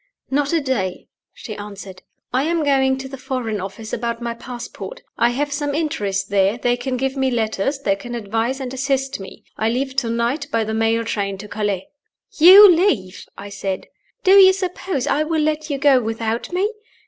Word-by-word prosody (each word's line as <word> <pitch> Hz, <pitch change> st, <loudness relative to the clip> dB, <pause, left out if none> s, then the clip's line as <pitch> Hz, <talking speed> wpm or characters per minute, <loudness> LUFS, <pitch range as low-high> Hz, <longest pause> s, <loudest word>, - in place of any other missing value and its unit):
"Not 285 Hz, +1 st, +1 dB
a 335 Hz, -, +2 dB
day!" 235 Hz, -, -3 dB, 0.2 s
she 215 Hz, -, -8 dB
answered. 200 Hz, -2 st, -9 dB, 0.3 s
"I 255 Hz, -, +2 dB
am 330 Hz, 0 st, 0 dB
going 265 Hz, -2 st, +2 dB
to 265 Hz, 0 st, -6 dB
the 270 Hz, 0 st, -9 dB
Foreign 250 Hz, -6 st, -3 dB
Office 200 Hz, +3 st, -7 dB
about 235 Hz, 0 st, -2 dB
my 235 Hz, -1 st, -3 dB
passport 245 Hz, -, -8 dB
I 235 Hz, -, +3 dB
have 285 Hz, +4 st, -2 dB
some 290 Hz, -1 st, -2 dB
interest 200 Hz, -11 st, -2 dB
there: 200 Hz, +2 st, +2 dB
they 245 Hz, 0 st, +1 dB
can 255 Hz, +1 st, -3 dB
give 265 Hz, +1 st, -1 dB
me 265 Hz, -1 st, +1 dB
letters; 225 Hz, +2 st, -1 dB
they 205 Hz, -8 st, 0 dB
can 240 Hz, +5 st, -7 dB
advise 230 Hz, +4 st, -2 dB
and 260 Hz, -1 st, -5 dB
assist 270 Hz, -1 st, -1 dB
me. 195 Hz, -, -11 dB
I 220 Hz, -, +1 dB
leave 260 Hz, +3 st, -2 dB
to 245 Hz, -4 st, +1 dB
night 235 Hz, +6 st, -1 dB
by 230 Hz, -1 st, +1 dB
the 220 Hz, 0 st, -4 dB
mail 225 Hz, +1 st, +1 dB
train 200 Hz, -3 st, -2 dB
to 210 Hz, +2 st, -9 dB
Calais." 205 Hz, -3 st, -2 dB, 0.5 s
"You 380 Hz, +6 st, +10 dB
leave?" 330 Hz, -, +1 dB
I 200 Hz, +1 st, -8 dB
said. 195 Hz, -1 st, -4 dB, 0.3 s
"Do 380 Hz, -, +4 dB
you 385 Hz, -1 st, +8 dB
suppose 365 Hz, -6 st, -3 dB
I 290 Hz, +1 st, +1 dB
will 310 Hz, 0 st, 0 dB
let 310 Hz, 0 st, -1 dB
you 285 Hz, -, -1 dB
go 275 Hz, -2 st, +4 dB
without 225 Hz, +2 st, -3 dB
me? 380 Hz, +4 st, 0 dB
245 Hz, 195 wpm, -20 LUFS, 215-285 Hz, 0.5 s, You